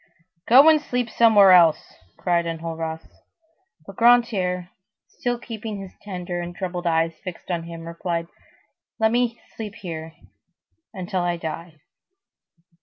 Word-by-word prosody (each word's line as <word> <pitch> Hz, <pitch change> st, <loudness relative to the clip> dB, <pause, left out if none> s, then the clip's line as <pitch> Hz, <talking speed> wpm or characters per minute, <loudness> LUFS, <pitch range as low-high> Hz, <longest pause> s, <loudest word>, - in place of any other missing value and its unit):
"Go 265 Hz, +6 st, +8 dB
and 310 Hz, -1 st, +6 dB
sleep 245 Hz, -5 st, -2 dB
somewhere 210 Hz, -4 st, +6 dB
else," 170 Hz, -4 st, +5 dB, 0.2 s
cried 170 Hz, -1 st, 0 dB
Enjolras. 165 Hz, -1 st, -4 dB, 0.8 s
But 195 Hz, +1 st, -12 dB
Grantaire, 205 Hz, -7 st, +3 dB, 0.4 s
still 245 Hz, 0 st, -3 dB
keeping 225 Hz, -3 st, -7 dB
his 195 Hz, -1 st, -9 dB
tender 180 Hz, -3 st, -5 dB
and 175 Hz, 0 st, -7 dB
troubled 180 Hz, -1 st, -4 dB
eyes 165 Hz, 0 st, +1 dB
fixed 185 Hz, 0 st, -7 dB
on 170 Hz, -1 st, -2 dB
him, 165 Hz, -1 st, -9 dB
replied:— 170 Hz, 0 st, -3 dB, 0.7 s
"Let 220 Hz, -1 st, +2 dB
me 240 Hz, -1 st, 0 dB, 0.2 s
sleep 215 Hz, -2 st, -7 dB
here,—until 180 Hz, -, -8 dB
I 175 Hz, 0 st, -1 dB
die." 165 Hz, -1 st, -7 dB
180 Hz, 120 wpm, -23 LUFS, 170-220 Hz, 0.8 s, Go